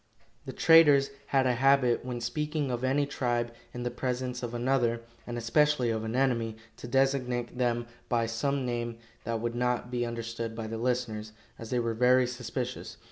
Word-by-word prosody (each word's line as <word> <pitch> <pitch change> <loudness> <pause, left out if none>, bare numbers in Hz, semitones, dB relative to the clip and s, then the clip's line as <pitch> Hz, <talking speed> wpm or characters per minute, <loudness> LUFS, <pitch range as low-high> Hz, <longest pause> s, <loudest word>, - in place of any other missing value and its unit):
The - - -3
traders 145 -4 +6 0.2
had 135 -1 +2
a 125 - +3
habit, 130 -1 +3
when 125 -1 -4
speaking 150 +3 -2
of 120 0 -3
any 135 +2 +2
tribe 120 -4 -1 0.2
in 125 - -5
the 120 - -2
presence 125 0 -3
of 120 -1 -4
another, 120 -1 +1 0.3
and 120 0 -4
especially 125 +2 +2
of 110 -1 -2
an 110 +1 -3
enemy, 115 -4 +1 0.2
to 120 - -8
designate 125 -2 0
them 120 -1 +1 0.2
by 115 -1 +2
some 135 +4 -1
name 120 -1 -3 0.3
that 115 0 -2
would 120 0 -2
not 125 0 -1
be 120 -1 0
understood 115 -1 -4
by 115 -1 -4
the 110 +1 -4
listeners, 115 -3 -2 0.3
as 115 - -8
they 125 - 0
were 115 -1 0
very 125 +2 +4
suspicious. 125 +1 -5
120 Hz, 180 wpm, -29 LUFS, 115-130 Hz, 0.3 s, traders